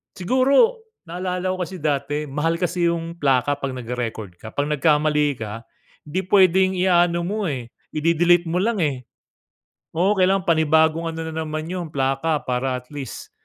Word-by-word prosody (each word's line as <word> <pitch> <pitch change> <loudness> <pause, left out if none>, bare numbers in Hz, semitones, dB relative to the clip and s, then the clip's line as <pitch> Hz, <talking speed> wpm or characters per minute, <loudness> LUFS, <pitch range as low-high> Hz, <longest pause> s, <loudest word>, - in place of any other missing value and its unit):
siguro, 270 - +3 0.3
naalala 180 +1 -3
ko - - -5
kasi 185 - -8
dati, 145 0 -1
mahal 165 +4 0
kasi 175 0 0
yung 170 0 -4
plaka 140 -1 +1
'pag 135 -2 -3
nagre-record 115 -6 -5
ka. 110 - -8
'Pag 145 +1 -1
nagkamali 150 -1 +2
ka, 110 +1 -6 0.4
'di 170 +5 -2
pwedeng 190 -1 +5
i-a-ano 175 -1 +3
mo 205 +2 -2
eh, 125 -5 -5 0.2
ide-delete 170 +2 +3
mo 175 - 0
lang 225 0 0
eh. 135 -5 -2 0.9
Oo, 190 +5 +2
kailangang 190 0 +2
panibagong 160 +1 +2
ano 160 0 -5
na 160 0 -3
naman 155 +1 -4
yun, 180 -2 -4
plaka 135 +3 0
para 125 0 -1
at 125 - -23
least, 135 -4 -7
160 Hz, 155 wpm, -22 LUFS, 140-180 Hz, 0.9 s, pwedeng